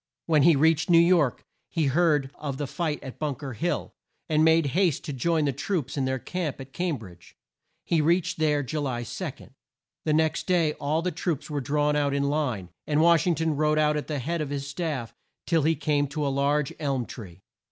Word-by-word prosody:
When 155 -3 +3
he 165 +2 +6
reached 160 +3 +3
New 170 - +7
York 170 -6 +3 0.3
he 160 -2 0
heard 145 -1 +2
of 140 -3 -5
the 145 - -2
fight 155 +1 -3
at 130 - -9
Bunk 145 -2 -3
er 135 -2 -4
Hill, 175 +9 -2 0.3
and 155 -1 +3
made 160 0 +5
haste 180 -4 +2
to 150 - -4
join 155 +4 +1
the 140 - 0
troops 140 0 -2
in 135 -2 0
their 130 0 0
camp 160 +2 -4
at 135 0 -10
Cam 175 -4 -1
bridge. 90 -6 -14 0.5
He 165 -2 +1
reached 170 +2 +1
there 150 -2 +2
Ju 150 +4 -3
ly 130 -4 -2
2. 145 - -4 0.7
The 155 - +2
next 160 0 +1
day 170 -4 +2
all 155 +3 0
the 180 - 0
troops 160 -2 -3
were 145 -1 -1
drawn 150 +2 +1
out 145 -1 +1
in 140 - +1
line, 140 - -1 0.2
and 150 0 +1
Wash 170 0 +4
ing 175 - +3
ton 160 0 0
rode 155 +1 +2
out 150 0 +3
at 150 - -3
the 150 - -2
head 160 +5 -2
of 150 - -3
his 140 -1 -3
staff 145 -5 -4 0.3
till 165 -3 +2
he 160 +3 +2
came 145 -1 0
to 150 +2 -3
a - - +1
large 140 +1 +1
elm 135 -5 -1
tree. 95 -7 -11
150 Hz, 215 wpm, -26 LUFS, 140-160 Hz, 0.7 s, New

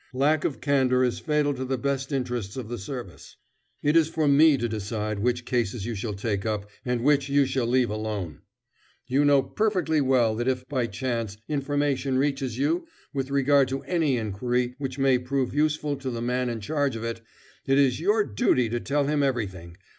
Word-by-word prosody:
Lack 145 +3 +2
of 140 - -2
candor 130 -3 +2
is 125 -2 0
fatal 150 -2 +1
to 130 -1 -4
the 130 0 -1
best 135 +2 -2
interests 125 -6 -3
of 120 -4 -5
the 120 -1 -4
service. 105 - -8 0.5
It 150 +2 +2
is 160 -1 +5
for 160 -2 0
me 145 +1 +6
to 120 -1 -1
decide 105 -1 -3
which 125 +2 0
cases 115 -4 -1
you 120 - -3
shall 105 0 -4
take 100 -1 -2
up 105 -2 -2 0.2
and 125 -1 -1
which 140 -1 +3
you 140 0 +4
shall 130 -2 -1
leave 125 -2 +2
alone. 105 -8 -4 0.6
You 135 +3 +2
know 140 -2 +5
perfectly 185 -8 0
well 130 -4 +3
that 120 +2 -2
if, 130 -1 -1
by 130 -4 -1
chance, 115 -2 -3
information 145 -2 0
reaches 135 -3 -1
you 155 - 0 0.3
with 135 -1 -2
regard 140 0 +3
to 135 +1 -4
any 150 -3 +1
inquiry 120 +3 -1
which 135 -2 -4
may 135 -2 +3
prove 130 +1 -1
useful 150 0 +1
to 135 -1 -4
the 120 -2 -4
man 125 +1 -1
in 115 -2 -4
charge 145 +2 -1
of 115 - -5
it, 115 0 -4 0.5
it 135 0 +3
is 135 -3 +3
your 210 +6 +3
duty 120 - +1
to 120 +1 -1
tell 140 +3 0
him 145 +1 +1
everything. 95 -11 -2
130 Hz, 195 wpm, -26 LUFS, 115-140 Hz, 0.6 s, me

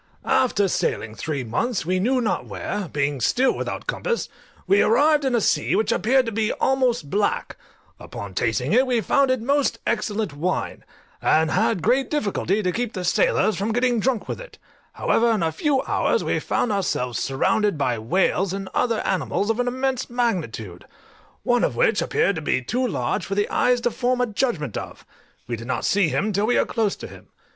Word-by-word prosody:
After 215 -6 +2
sailing 110 - -1
three 145 +2 -3
months 195 - -2
we 185 +2 0
knew 250 +6 +1
not 225 - -1
where, 205 -3 -4
being 140 -2 -1
still 255 - +2
without - - -4
compass, 485 -1 -2 0.4
we 195 +2 +4
arrived 295 +6 +4
in 265 -2 +1
a - - +3
sea - - +1
which 220 - +1
appeared 255 +7 +2
to 230 - -3
be 220 0 0
almost 250 - 0
black: 205 +1 0 0.4
upon 100 -2 -8
tasting 120 - 0
it 255 +3 +4
we 245 -2 +2
found 270 +6 +2
it 255 -3 0
most 280 +2 +1
excellent 215 -5 -1
wine, 170 +6 -3 0.4
and 160 0 +3
had 160 +1 +1
great 265 +1 +2
difficulty 210 - 0
to 180 - +1
keep 235 +3 -3
the 185 - -4
sailors 210 +4 +2
from 205 +3 -1
getting 245 0 +1
drunk 245 0 -1
with - - -5
it: - - -12 0.4
however, 235 +1 +2
in 210 -6 0
a 160 - +1
few 270 - 0
hours - - +1
we - - 0
found 240 - -1
ourselves 150 - -1
surrounded 200 +8 +1
by 125 -5 0
whales 185 - +1
and 195 -1 -5
other 230 -3 +1
animals 200 +3 0
of 225 - -3
an 245 - 0
immense 260 0 -1
magnitude, 165 - -2 0.6
one 245 0 +2
of - - 0
which - - +2
appeared 320 - +1
to 160 - -4
be 150 - +1
too 245 - -1
large - - -2
for 195 - -4
the 205 0 +1
eye 250 - +3
to 240 0 -1
form 250 +1 0
a 250 - +3
judgment 205 - -2
of: - - -7 0.4
we 120 - -3
did 115 +1 -9
not 130 - -2
see 200 -3 +3
him 175 +11 -1
till 200 +3 +1
we 245 - +2
were - - +3
close 220 -4 -1
to - - -9
him. - - -13
215 Hz, 195 wpm, -23 LUFS, 170-245 Hz, 0.6 s, we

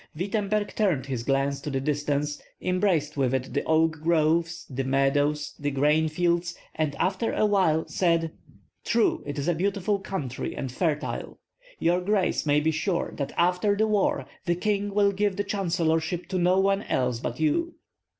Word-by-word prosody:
Wittemberg 205 +4 -1
turned 180 -12 +1
his 130 -4 -3
glance 135 +2 0
to - - -4
the 135 -2 -1
distance, 145 +1 -1 0.2
embraced 180 -6 0
with 135 -2 +2
it 130 0 -3
the - - 0
oak 160 0 +2
groves, 165 +1 +1
the 135 0 -3
meadows, 145 +2 +1
the 145 - -1
grain 150 +3 +2
fields, 175 +2 0 0.2
and 155 -2 -1
after 190 +4 0
a - - +2
while 185 -6 +2
said: 165 -3 +1 0.5
"True, 230 -1 +2
it 145 0 -4
is 140 +2 -2
a 175 - +3
beautiful 200 +3 0
country 150 -10 -4
and 130 - -4
fertile. 150 +2 -2 0.4
Your 175 +2 +2
grace 190 -4 0
may 145 0 +4
be 155 +2 +1
sure 170 +3 -1
that 140 -1 -3
after 180 +4 +2
the 220 - +3
war 210 -2 +1 0.2
the 175 - +2
king 205 +2 -1
will 200 0 +3
give 200 0 0
the 205 - -1
chancellorship 170 -3 0
to 185 - -1
no 180 +2 +3
one 195 +1 +2
else 125 - -1
but - - -4
you." 335 +2 +1
165 Hz, 170 wpm, -26 LUFS, 145-195 Hz, 0.5 s, may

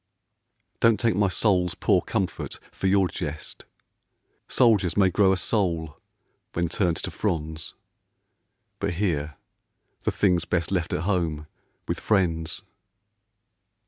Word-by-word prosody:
Don't 115 -2 +4
take 115 -3 +2
my 100 0 +3
soul's 90 -3 +1
poor - - +2
comfort - - -3
for 95 - -2
your 95 -1 +4
jest. 75 -2 -6 0.8
Soldiers 105 -8 +3
may 95 -2 +4
grow 95 +1 +4
a 95 - +2
soul 85 -7 -1 0.5
when 85 -1 0
turned 85 -1 +1
to - - -4
fronds, 80 -5 -3 1.0
But 100 -2 -1
here 75 -6 -1 0.7
the - - 0
thing's 90 -4 +2
best 85 +1 -1
left 90 -3 -1
at - - -1
home 85 -6 -1 0.4
with - - -2
friends. 85 -5 0
90 Hz, 120 wpm, -25 LUFS, 80-100 Hz, 1.0 s, Don't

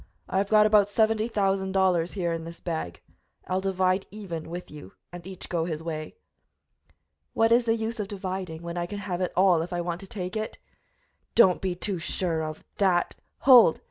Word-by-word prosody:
I 190 - 0
have 200 0 -1
got 215 -1 +6
about 210 -1 +4
seventy 220 +1 +2
thousand 195 -3 0
dollars 180 -3 +2
here 175 -4 -1
in 165 0 -4
this 170 +1 -9
bag; 160 - -5 0.4
I'll 185 +1 -1
divide 190 0 0
even 175 -7 -7
with 175 +2 -7
you 145 -11 -11 0.2
and 175 0 -9
each 190 -2 -8
go 165 -2 -1
his 160 -2 -4
way." 155 -2 -5 1.2
"What 225 0 +3
is 235 +1 +4
the 225 - +3
use 225 +1 -4
of 205 - -2
dividing, 185 -4 -5
when 170 +1 -4
I 175 - -2
can 205 - -6
have 190 -3 -4
it 180 - -1
all 185 -3 +4
if 170 - -5
I 175 0 -1
want 170 0 -3
to 195 - -10
take 185 -4 -5
it?" 215 0 -4 0.8
"Do 235 - +9
not 180 - -3
be 185 -2 -1
too 185 0 -3
sure 165 -1 -1
of 155 0 -6 0.2
that 185 -3 +2
" - - -47
"Hold! 245 -11 +8
185 Hz, 205 wpm, -26 LUFS, 170-205 Hz, 1.2 s, Do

